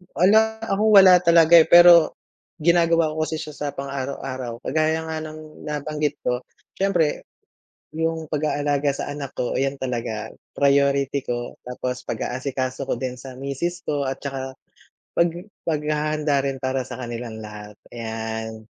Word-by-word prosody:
Wala 220 +4 +4
ako 210 -2 -1
wala 190 -2 +9
talaga, 170 0 +7
eh, 160 - +7
pero, 170 -1 +8 0.5
ginagawa 165 -1 +3
ko 155 0 -1
kasi 160 0 -4
siya 155 - -7
sa 145 -1 -3
pang 140 0 -6
araw-araw. 130 -3 -5
Kagaya 160 +3 0
nga 160 - -3
ng 155 0 -11
nabanggit 150 0 -3
ko, 125 0 -2 0.3
siyempre 175 -6 +1 0.7
yung 160 0 -2
pag-aalaga 145 -1 0
sa 135 - -5
anak 140 -2 -6
ko 125 - -1
ayan 135 +1 0
talaga 115 -4 -4 0.2
priority 140 0 +2
ko 120 0 -4
tapos 125 0 -4
pag-aasikaso 130 +1 -3
ko - - 0
din 125 +1 -3
sa 130 0 -10
misis 155 +6 -4
ko 145 -2 0
at 135 0 -3
tsaka, 135 -1 -5 0.6
pag 170 0 +3 0.4
paghahanda 150 -1 0
rin 135 -1 -1
para 130 0 -1
sa - - -7
kanilang 120 -2 -6
lahat 105 0 -10 0.2
ayan. 110 -1 -5
140 Hz, 145 wpm, -23 LUFS, 130-160 Hz, 0.7 s, wala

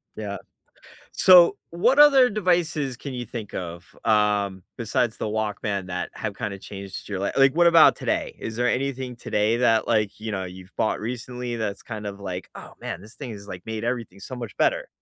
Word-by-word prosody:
Yeah. 100 -2 -5 0.8
So, 180 -2 +7
what 215 +12 +2
other 275 -4 +8
devices 170 - 0
can 130 +1 -7
you 125 - -4
think 110 -2 -7
of, 85 0 -7
um, 105 -3 +2
besides 120 0 0
the - - -3
Walkman 105 -2 -2
that 90 -1 -4
have 105 -2 -4
kinda 105 -4 -4
changed 100 0 -8
your 95 -2 -3
li 100 - 0
like, 135 0 +5
what 175 0 +4
about 165 -2 +7
today? - - -2
Is 110 0 -6
there 120 0 +1
anything 130 -1 -2
today 110 0 0
that, 115 -3 +3
like, 105 -3 +1
you 110 0 -5
know, 95 -2 -2
you've 95 +1 -11
bought 110 - +1
recently 125 +1 -4
that's 100 -3 -3
kind 105 -3 -6
of 100 0 -6
like, 95 -2 -6
"Oh, - - -11
man. 85 - -5
This 110 +5 -13
thing 135 -4 -7
has, 100 -1 -10
like, 90 -3 -8
made 110 0 -4
everything 115 -6 -3
so 130 - -7
much 120 -1 -7
better." - - +1
110 Hz, 195 wpm, -24 LUFS, 100-130 Hz, 0.8 s, other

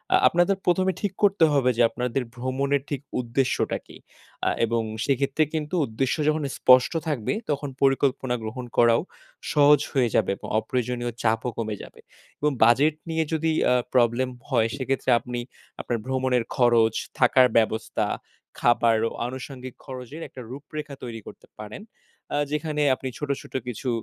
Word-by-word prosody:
আ - - +7
আপনাদের 175 +3 +2
১ম 185 +1 +3
এ - - -9
ঠিক 200 -2 -1
করতে 195 -5 +5
হবে 130 -3 +3
যে - - +3
আপনাদের 125 +1 -2
ভ্রমণের 135 +3 0
ঠিক 140 -3 -3 0.2
উদ্দেশ্যটা 125 +2 0
কি? - - -13 0.5
আ - - +4 0.2
এবং 115 0 0 0.2
সেক্ষেত্রে 140 +2 +1
কিন্তু 155 +2 -2
উদ্দেশ্য 125 +3 -1
যখন 155 0 +1
স্পষ্ট 130 0 +6 0.2
থাকবে 135 - -1 0.2
তখন 145 -1 -1
পরিকল্পনা 135 -2 +2
গ্রহণ 120 +3 -5
করাও 115 +1 +5 0.5
সহজ 145 -1 +6
হয়ে 125 -4 +2
যাবে - - +2
এবং - - -9
অপ্রয়োজনীয় 120 0 -2
চাপও 110 +2 +1
কমে 110 -2 -2
যাবে - - -13 0.4
এবং 150 0 +2
বাজেট 140 +7 +4
নিয়ে 160 0 +1
যদি 160 0 +1 0.2
আ - - +5 0.2
প্রবলেম 125 +1 +3 0.2
হয় 115 -4 +3
সেক্ষেত্রে 135 0 -2
আপনি 125 -1 -5 0.4
আপনার 120 - -2
ভ্রমণের 130 -2 +1
খরচ, 115 -3 +4 0.3
থাকার 130 -1 +6
ব্যবস্থা, 110 0 +1 0.5
খাবার 120 -1 +3
ও - - -2 0.2
আনুষঙ্গিক 130 0 -7
খরচের 130 +4 -8
একটা 130 - -11
রূপরেখা 145 +1 -7
তৈরি 115 -2 -6
করতে - - -12
পারেন। 105 - -8 0.5
আ - - +1
যেখানে 150 0 -1
আপনি 130 - -5
ছোট, 150 -1 -5
ছোট - - -15
কিছু 125 +2 -4
130 Hz, 155 wpm, -25 LUFS, 120-145 Hz, 0.5 s, আ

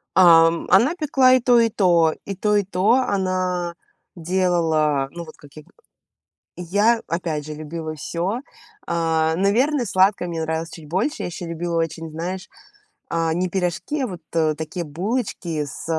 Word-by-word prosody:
Ам, 165 -2 +6
она 245 - +4
пекла 270 -6 +3
и 255 - +4
то 240 0 +4
и 230 -1 +3
то 170 -6 +3
и 200 - -5
то 210 +2 +1
и 205 - +3
то, 195 +3 +1
она 185 -7 0 0.4
делала, 165 -5 +1
ну 170 +2 -7
вот 155 - -13
как 145 - -17
я 155 - -10
г - - -26 0.9
Я 205 +7 +1
опять 160 -3 -3
же 155 - -7
любила 155 +1 -6
всё. 175 - -3 0.5
А, 160 -1 +1
наверное, 245 - +2
сладкое 190 -2 +2
мне 165 -1 -4
нравилось 160 +1 -3
чуть 160 -3 -11
больше. 205 - -1
Я - - -2
еще 175 0 -6
любила 170 +1 -3
очень, 165 0 -5
знаешь, 180 +4 -5 0.6
а, 165 -1 0
не 180 +2 0
пирожки, 180 - -2
а, 260 - 0
вот, 180 -5 -8
э, 160 -2 +1
такие 160 +2 -5
булочки 175 - -3
с 140 - -9
175 Hz, 165 wpm, -22 LUFS, 160-200 Hz, 0.9 s, Ам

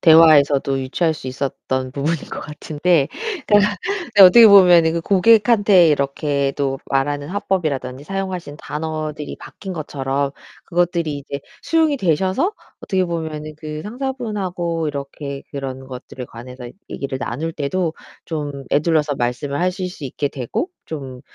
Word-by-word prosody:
대화에서도 145 -4 +6
유추할 160 +5 0
수 130 - -9
있었던 130 0 -3
부분인 150 +4 0
것 - - -5
같은데 150 0 0 0.4
그니까 205 0 +4 0.4
네 200 - +10
어떻게 220 +5 +10
보면은 175 -5 +7
그 170 - 0
고객한테 205 -2 +5
이렇게 140 -1 0
또 135 -2 -1
말하는 145 +1 -1
화법이라든지 150 -9 -2
사용하시는 185 -4 -4
단어들이 155 -1 -5
바뀐 190 -2 -8
것처럼 140 -2 -2 0.3
그것들이 170 -4 0
이제 140 0 -6 0.2
수용이 320 -3 +2
되셔서 190 - +1 0.3
어떻게 190 -2 0
보면은 160 -3 -4
그 155 0 -6
상사분하고 205 - -3
이렇게 140 0 -6
그런 135 -1 -6
것들에 125 0 -8
관해서 125 +1 -10 0.2
얘기를 135 -1 -4
나눌 150 +7 -3
때도 160 +3 -1 0.3
좀 145 -4 -5
에둘러서 150 -1 +2
말씀을 125 +4 -2
하실 180 +1 -1
수 165 - -9
있게 140 +2 -2
되고 140 - -3 0.2
'좀 135 -5 -7
155 Hz, 335 characters per minute, -20 LUFS, 140-180 Hz, 0.4 s, 네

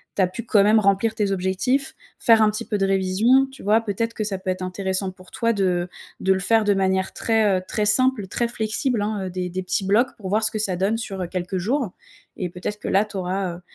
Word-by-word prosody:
tu - - +1
as - - +3
pu 185 +6 -7
quand 210 -4 +4
même 215 +2 +5
remplir 200 +2 +2
tes 205 -2 0
objectifs. 195 +9 0 0.2
Faire 225 -1 +5
un 215 - +5
petit 210 - -4
peu 210 0 -1
de 195 - +2
révisions, 195 +8 +3
tu 270 - -13
vois, 215 +3 +3
peut-être 230 +1 -2
que 215 - -2
ça 205 -2 -2
peut 190 - -5
être 185 0 -2
intéressant 190 +1 -2
pour 185 0 -17
toi 230 0 0
de 180 -4 0 0.3
de 190 - +3
le 190 - -1
faire 220 +4 +3
de 205 -1 +3
manière 190 -1 0
très, 220 -4 +2
heu, - - -9
très 210 - -1
simple, 235 -1 +2
très 235 +5 -1
flexible, 225 +1 -1
hein? 205 -2 -2
Heu, - - -4
des 180 0 -4
des 185 +2 -3
petits 190 +1 -1
blocs 225 +7 +2
pour 195 -3 -6
voir 215 +3 +1
ce 220 - +3
que 220 - -3
ça 195 -3 0
donne 195 +5 0
sur, 200 -4 -5
heu, 180 - -2
quelques 180 +1 -3
jours 230 +4 -1 0.4
et 180 - -3
peut-être 180 +4 -5
que - - -7
là, 200 +2 +3
tu 205 -1 -8
auras, 185 -1 -2
heu, - - -15
200 Hz, 260 wpm, -23 LUFS, 190-220 Hz, 0.4 s, même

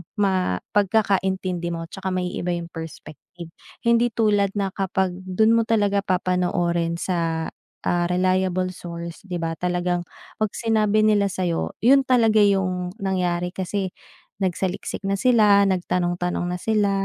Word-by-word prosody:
ma 190 - +1 0.2
pagkakaintindi 190 -3 +1
mo. 165 0 -4
Tsaka 190 0 -4
maiiba 180 -1 -2
yung 170 -1 -6
perspective. 165 +1 -10 0.3
Hindi 235 0 +4
tulad 205 -3 +2
na 200 -2 -1
kapag 190 -1 -1
dun 190 +4 +2
mo 230 - +2
talaga 205 -3 +2
papanoorin 175 -2 0
sa, 165 -3 -1 0.3
ah, 175 0 +1
reliable 185 0 +1
source, 170 -1 -8
'di 180 - -4
ba, 165 0 -2
talagang 180 0 -1 0.3
‘pag 215 -2 0
sinabi 215 -2 +2
nila 210 -2 +3
sa'yo, 175 -2 -2
yun 270 +3 +5
talaga 225 -4 +4
yung 185 -3 +1
nangyari 180 -2 0
kasi 190 0 -3 0.5
nagsaliksik 190 +1 -2
na 195 0 -1
sila, 210 -5 +5
nagtanong-tanong 180 -1 -1
na - - -4
sila. 210 -2 +1
185 Hz, 130 wpm, -23 LUFS, 175-205 Hz, 0.5 s, yun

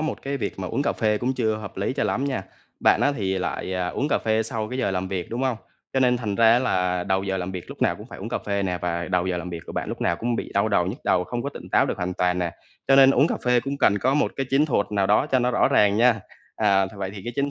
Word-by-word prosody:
một 155 - -3
cái 140 0 -2
việc 120 - -4
mà 95 - -4
uống 140 - -1
cà - - +1
phê 105 -2 0
cũng 130 +3 -1
chưa 110 -4 0
hợp 105 -3 -9
lý 100 +6 -1
cho 140 - -1
lắm 135 - 0
nha. 135 -8 -2 0.4
Bạn - - +4
á 145 - +3
thì 95 -2 -1
lại, 95 +1 -3
à, 90 -1 -1
uống 140 +10 -2
cà - - +2
phê 110 0 +1
sau 110 -1 -4
cái 125 - -5
giờ 130 - 0
làm 95 0 -2
việc, 95 -3 -4
đúng 120 +3 -3
hông? 130 -3 0 0.4
Cho 130 - +1
nên 125 -1 +4
thành 110 -4 -3
ra 115 +2 +5
là 90 -7 0
đầu 95 0 0
giờ 95 -1 -2
làm 90 +1 -4
việc 90 -2 -6
lúc - - -6
nào - - +2
cũng - - -11
phải - - -10
uống - - -6
cà - - -2
phê 100 -1 -2
nè 90 -2 -1
và 85 0 -2
đầu 90 -1 +1
giờ 90 -1 -1
làm 90 +1 -5
việc 85 -1 -5
của - - -7
bạn - - -3
lúc - - -5
nào 85 - +1
cũng 120 +3 -1
bị - - -5
đau 100 +2 +2
đầu 90 -4 +2
nhức 95 - -4
đầu, 90 -1 +2
không 120 +3 -4
có 140 - -2
tỉnh - - -10
táo - - +3
được - - -2
hoàn 90 +1 -3
toàn 90 0 +1
nè, 90 -1 -1 0.4
cho 135 - +6
nên 135 0 +8
uống 140 - +4
cà - - -1
phê 125 -1 +3
cũng 140 +2 -4
cần 105 -5 +3
có 130 +6 +1
một 150 - +1
cái 135 - -2
chiến 140 +3 +3
thuật 115 -8 +1
nào 100 -2 +2
đó 105 +7 +3
cho 130 - +2
nó 125 0 +1
rõ 120 - +3
ràng 105 -1 +4
nha. 115 -1 +4 0.4
À, 95 -1 +3
vậy 95 -1 -4
thì 100 - -7
cái 120 - -4
chiến 140 0 0
105 Hz, 320 wpm, -24 LUFS, 95-125 Hz, 0.4 s, nên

